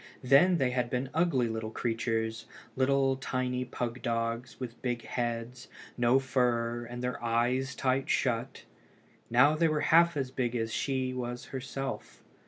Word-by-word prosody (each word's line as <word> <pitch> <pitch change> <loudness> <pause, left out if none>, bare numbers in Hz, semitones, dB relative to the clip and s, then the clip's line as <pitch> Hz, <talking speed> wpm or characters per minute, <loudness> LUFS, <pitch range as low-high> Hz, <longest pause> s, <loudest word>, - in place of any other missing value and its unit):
Then 140 +8 +5
they 130 -4 +1
had 125 -1 0
been 130 +2 -2
ugly 155 -7 +2
little 110 -1 -3
creatures, 115 0 -2 0.3
like 135 0 +2
tiny 125 -1 -1
pug 125 -1 -4
dogs, 115 +1 -2
with 125 -2 -7
big 120 -2 -2
heads, 120 +1 -3 0.3
no 120 +1 +4
fur, 120 -3 0
and 120 +1 -7
their 125 -1 -3
eyes 125 +3 +1
tight 130 0 0
shut. 125 0 0 0.7
Now 125 +6 +5
they 165 +1 +3
were 155 -1 0
half 170 0 +5
as 130 -2 -2
big 125 -2 -1
as 115 -1 -2
she 130 -2 -1
was 120 -1 -4
herself. 135 +1 -5
125 Hz, 150 wpm, -30 LUFS, 120-135 Hz, 0.7 s, Then